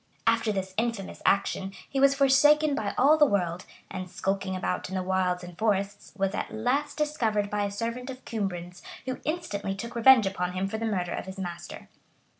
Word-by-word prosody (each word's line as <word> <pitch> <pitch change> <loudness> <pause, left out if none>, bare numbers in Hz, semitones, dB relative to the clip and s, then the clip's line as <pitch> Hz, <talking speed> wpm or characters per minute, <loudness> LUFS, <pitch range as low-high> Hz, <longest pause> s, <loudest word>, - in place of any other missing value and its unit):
After 230 -1 +3
this 190 -2 -3
infamous 225 -4 -2
action, 195 -1 +1
he 275 - -2
was 275 0 +5
forsaken 290 +2 +5
by 215 -6 -2
all 300 +4 +5
the 295 - +7
world; 180 -4 -1 0.2
and 185 -1 -5
skulking 190 +1 -2
about 185 0 -2
in 190 - -5
the 185 - -1
wilds 180 -1 0
and 175 -1 -9
forests, 200 0 -1
was 195 0 0
at - - -3
last 260 +7 -1
discovered 225 -9 0
by 205 0 0
a - - -2
servant 230 +5 -4
of 260 0 -8
Cumbran's, 180 -5 -4 0.2
who 255 0 -4
instantly 205 - -2
took 235 +4 -6
revenge 235 -1 +7
upon 180 -2 -2
him 185 +1 -1
for 220 +2 -4
the 225 - -1
murder 180 -5 -1
of - - -5
his 190 +1 -7
master. 175 -3 -7
205 Hz, 195 wpm, -27 LUFS, 190-250 Hz, 0.2 s, the